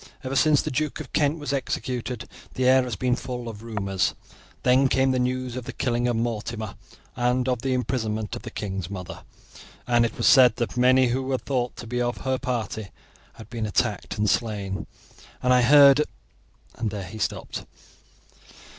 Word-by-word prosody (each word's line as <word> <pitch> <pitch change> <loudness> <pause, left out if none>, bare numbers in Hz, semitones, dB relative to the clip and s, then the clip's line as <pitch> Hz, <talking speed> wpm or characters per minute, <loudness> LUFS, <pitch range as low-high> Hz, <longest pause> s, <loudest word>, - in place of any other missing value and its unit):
Ever 130 +1 -3
since 150 +1 +4
the - - -3
Duke 150 +3 -1
of - - -9
Kent 150 +1 +2
was 145 -2 -3
executed 125 -2 -3 0.3
the 130 0 +1
air 130 0 +6
has 125 -3 -3
been 125 +4 +1
full 125 -1 -6
of 110 -2 -7
rumours. 100 -4 -1 0.5
Then 130 +2 +5
came 130 0 +2
news 125 -1 -1
of 125 -2 -5
the - - -5
killing 120 -1 0
of 120 - +1
Mortimer 115 -2 -3 0.4
and 125 +1 +1
of 125 -2 0
the 130 0 0
imprisonment 110 -3 -2
of 120 - -7
the 115 - -7
king's 95 -5 -4
mother, 90 -3 -7 0.6
and 120 -1 +3
it 115 - -2
was - - -1
said 125 -4 +7
that 120 0 -3
many 130 +1 +4
who 130 +2 0
were 130 0 -1
thought 125 -2 -2
to - - -8
be 125 +2 -2
of 120 0 -1
her 130 -1 0
party 110 -4 -3 0.4
had 115 - -12
been 115 -2 -2
attacked 105 0 -1
and 105 0 +1
slain, 100 -3 -1 0.6
and 125 0 +4
I 125 - +5
heard 140 +2 +7 0.4
" - - -33
and 110 - 0
there 100 -1 -5
he 110 +5 -9
stopped. - - -3
125 Hz, 185 wpm, -25 LUFS, 110-130 Hz, 0.6 s, said